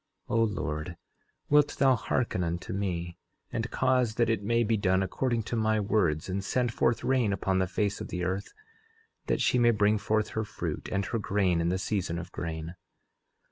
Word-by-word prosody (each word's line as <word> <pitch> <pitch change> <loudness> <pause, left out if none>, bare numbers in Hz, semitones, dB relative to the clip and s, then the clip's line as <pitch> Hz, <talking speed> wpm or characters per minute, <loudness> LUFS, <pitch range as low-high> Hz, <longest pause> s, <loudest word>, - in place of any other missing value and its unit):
11:13 - - +2
O - - +5
Lord, 80 -5 -3 0.5
wilt 145 0 +4
thou 135 -2 +5
hearken 115 -5 -1
unto 85 +2 -3
me, 90 -3 -3 0.3
and 115 +1 -2
cause 130 -4 +1
that 115 -1 +2
it 110 -3 0
may 115 +3 +2
be 115 0 +2
done 95 -2 +2
according 115 +4 -1
to 120 - -3
my 110 -1 +2
words, 95 -7 +1
and 95 +1 -2
send 120 +2 0
forth 115 0 +1
rain 125 -6 +2
upon 95 -1 0
the 95 - +1
face 100 +2 -1
of - - -4
the 90 0 -4
earth, 95 +3 -2 0.8
that - - +1
she 125 - +3
may 120 -1 +5
bring 105 -1 +3
forth 110 +1 0
her 110 - -2
fruit, 105 - -5
and 100 0 0
her 90 +7 -2
grain 95 -4 +1
in 85 - +1
the 90 - 0
season 95 -3 -2
of 90 +2 -7
grain. 80 -1 -5
100 Hz, 195 wpm, -29 LUFS, 90-115 Hz, 0.8 s, O